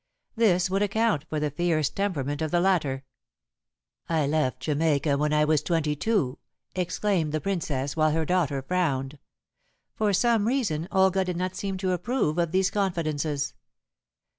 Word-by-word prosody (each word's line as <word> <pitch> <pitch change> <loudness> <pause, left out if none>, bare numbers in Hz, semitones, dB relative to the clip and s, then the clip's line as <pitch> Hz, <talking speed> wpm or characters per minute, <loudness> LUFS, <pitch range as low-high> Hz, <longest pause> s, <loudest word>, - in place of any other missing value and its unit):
This 190 -6 +3
would 195 +1 0
account 205 -5 +1
for 155 - -1
the 150 -1 -1
fierce 155 -1 +1
temperament 145 -8 -2
of 155 - 0
the 175 - +2
latter. 155 -8 +1 1.1
"I 160 -3 +2
left 145 -3 0
Jamaica 150 -1 +1
when 150 +1 0
I 150 0 +3
was 155 -1 +2
twenty 155 -3 0
two," 165 - 0 0.3
explained 180 -2 0
the 155 - +1
Princess, 145 -8 -2
while 155 -1 +3
her 160 +1 0
daughter 150 -6 0
frowned. 140 -4 -1 0.7
For 215 -1 +1
some 220 +2 +2
reason 205 - 0
Olga 190 0 +3
did 180 -2 -3
not 185 +1 -2
seem 195 0 -3
to 185 0 -1
approve 180 -3 0
of 170 -2 +1
these 190 +1 +2
confidences. 155 -7 -1
165 Hz, 155 wpm, -26 LUFS, 150-190 Hz, 1.1 s, This